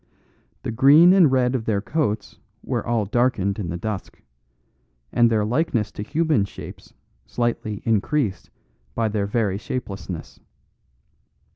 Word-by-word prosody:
The - - -3
green 150 +9 +7
and 175 -8 +5
red 125 -1 +2
of 120 -4 -2
their 105 -3 +1
coats 110 -3 -2 0.2
were - - -2
all 115 -3 0
darkened 105 -3 0
in 90 -5 -3
the 85 - -3
dusk; 105 0 -5 0.9
and 120 -1 +4
their 110 -2 +1
likeness 120 -3 0
to - - -7
human 150 0 +1
shapes 100 - -10 0.3
slightly 115 - -2
increased 110 - 0 0.5
by 115 -1 0
their 105 -1 -1
very 100 -3 0
shapelessness. 95 -7 -6
110 Hz, 130 wpm, -23 LUFS, 100-130 Hz, 0.9 s, green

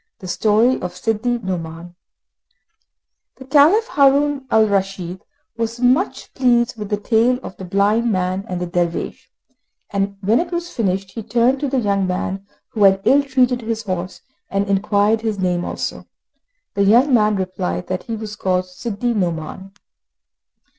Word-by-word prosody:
The 185 - -10
Story 220 +6 +2
of 180 0 -5
Sidi 225 +5 0
Nouman 175 -4 -6 1.4
The 260 - -12
Caliph, 305 - +5
Haroun 280 - +3
al 220 0 +4
Raschid, 195 -3 -2 0.4
was 230 +1 -3
much 255 +10 +1
pleased 245 -1 +2
with 210 -2 -7
the 210 - 0
tale 230 +4 +2
of - - -8
the 190 - -7
blind 205 +5 +2
man 185 0 -1
and 180 -1 -3
the 180 - -2
dervish, 175 -1 -3 0.6
and 200 0 -1
when 210 +4 +3
it 345 - -3
was 345 0 -3
finished 195 -3 -1
he 225 - -6
turned 235 +5 +1
to 285 -1 -1
the 270 - 0
young 200 -4 0
man 190 +2 -3 0.2
who 215 - 0
had 195 0 +4
ill 280 +2 +5
treated 255 -3 +1
his 225 -1 -3
horse, 185 -2 -4 0.3
and 195 +1 -1
inquired 205 +2 +2
his 220 -2 -2
name 180 -2 0
also. - - -5 0.7
The 200 - -1
young 240 +8 +4
man 215 -3 +4
replied 180 - -3
that 185 -1 -3
he 230 - -3
was 215 -1 -6
called 185 -2 0
Sidi 220 +5 -3
Nouman. 180 -1 -3
210 Hz, 160 wpm, -20 LUFS, 185-240 Hz, 1.4 s, Caliph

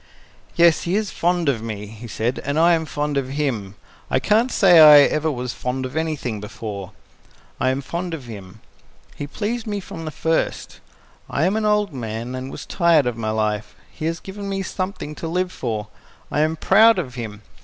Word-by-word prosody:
"Yes, 170 -1 +5
he 175 +3 -1
is 210 -1 -1
fond 175 -1 0
of 125 -6 +1
me," 110 -2 -5
he 110 +3 -10
said, 115 +3 -2
"and 140 +2 -2
I 170 +2 +5
am 160 -1 0
fond 145 -1 -2
of 135 -2 -1
him. 110 -10 -2 0.3
I 130 - +2
can't 220 - +2
say 180 -5 +6
I 150 -2 +10
ever 155 +2 +2
was 125 -2 -4
fond 130 +1 -3
of 130 - -7
anything 150 -9 -2
before. 105 -2 -7 0.7
I 130 - +2
am 130 +1 -1
fond 170 +5 -4
of 140 -6 -10
him. 105 -2 -10 0.5
He 145 - -5
pleased 220 +8 -3
me 205 -1 -2
from 165 -3 -8
the - - -3
first. 160 +1 -2 0.5
I 150 - +1
am 190 +3 +1
an 220 0 0
old 210 -4 +2
man, 115 0 -5
and 130 +1 -5
was - - -8
tired 170 -6 +3
of 125 -2 -1
my 110 -1 -3
life. 105 -1 -1 0.2
He 155 - -6
has 165 0 -1
given 200 +1 -7
me 195 0 -2
something 185 -4 -4
to 165 - -6
live 180 +2 -1
for. 110 - -4 0.4
I - - 0
am 155 +1 +2
proud 225 +7 +5
of 125 - -3
him. 110 -4 -7
145 Hz, 200 wpm, -22 LUFS, 115-175 Hz, 0.7 s, I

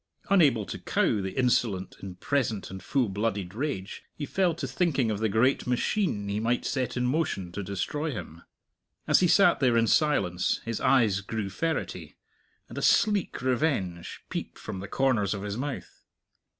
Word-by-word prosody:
Unable 140 - +4
to - - -6
cow 105 - +1
the 95 +4 -5
insolent 115 -7 +1
in 95 -2 -7
present 115 -6 -1
and 95 0 -7
full 135 -4 0
blooded 100 -2 -2
rage, 115 -6 -4
he 145 - -4
fell 180 +1 +1
to - - -4
thinking 140 -10 +1
of 105 - -2
the 110 0 +1
great 120 +7 +2
machine 125 - 0
he 100 +1 -1
might 115 +2 0
set 130 -3 -2
in 125 - 0
motion 125 - -1
to 100 - -5
destroy 100 - -3
him. 85 - -7 0.6
As - - +4
he 180 - +4
sat 200 +4 +5
there 125 -4 +3
in 115 - +4
silence, 110 - +2
his 115 -2 -3
eyes 110 -7 +3
grew 105 -1 -4
ferrety, 165 - -3 0.5
and - - -6
a - - -4
sleek 210 - +2
revenge 120 - -1
peeped - - -5
from 105 -3 -6
the 100 - -6
corners 115 -7 +1
of 100 - -6
his 105 -1 -3
mouth. 135 +3 -6
115 Hz, 175 wpm, -27 LUFS, 100-140 Hz, 0.6 s, sat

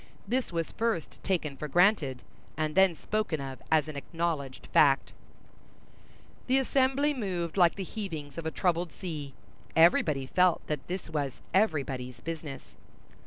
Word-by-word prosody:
This 250 +1 0
was 165 -1 -2
first 225 -8 -2
taken 160 -7 -1
for 150 - -5
granted, 160 -6 +3 0.3
and 155 -1 -1
then 190 -1 +5
spoken 215 -4 -2
of 135 -1 -6
as 155 -1 +4
an 155 - -6
acknowledged 145 -3 -3
fact. 135 -2 +4 1.3
The 260 +1 +4
assembly 270 +2 +2
moved 180 - -3
like 175 -3 +5
the 195 - -4
heavings 165 -8 -6
of 160 - -4
a - - +1
troubled 175 0 0
sea. 150 -7 -6 0.4
Everybody 155 -4 +4
felt 180 +5 +2
that 150 -2 -4
this 185 +1 -4
was 145 -4 -1 0.2
everybody's 135 - 0
business. 155 -2 -7
165 Hz, 140 wpm, -29 LUFS, 145-190 Hz, 1.3 s, then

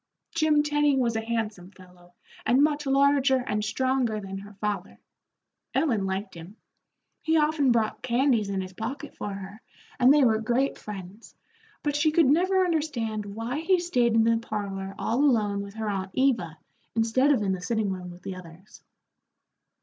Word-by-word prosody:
Jim 310 -2 +3
Tenny 295 -1 +2
was 235 -3 +1
a 225 - 0
handsome 220 -5 -3
fellow, 180 -2 -19 0.3
and 260 +4 +4
much 295 -1 0
larger 275 0 +4
and 210 -3 -1
stronger 255 -2 0
than 195 -1 -6
her 205 +1 -12
father. 210 +1 -4 0.8
Ellen 225 -11 +1
liked 190 +1 -3
him; 170 +4 -11 0.7
he 320 0 +2
often 300 -3 +2
brought 225 -2 0
candies 240 -4 +1
in 195 -1 -1
his 185 0 -8
pocket 265 +8 -6
for 205 - -5
her, 195 +3 -8 0.4
and 255 +1 +6
they 295 -1 +5
were 220 -3 +3
great 245 +5 0
friends, 200 +1 -9 0.5
but 290 -1 -1
she 295 +2 +3
could 315 +1 +4
never 370 +7 +3
understand 245 - -2
why 225 +7 -4
he 370 +3 +3
stayed 250 -10 +1
in 225 - +5
the 230 0 +3
parlor 195 -3 -5
all 235 +3 -1
alone 210 -7 +2
with 200 +1 -9
her 220 -1 -4
aunt 195 -2 -2
Eva, 225 -12 +1 0.4
instead 230 +5 +3
of 250 -7 +2
in 195 - 0
the 185 -1 -3
sitting 215 0 -1
room 180 -1 -6
with 175 +1 -13
the 190 - -5
others. 180 +2 -13
225 Hz, 170 wpm, -26 LUFS, 200-275 Hz, 0.8 s, and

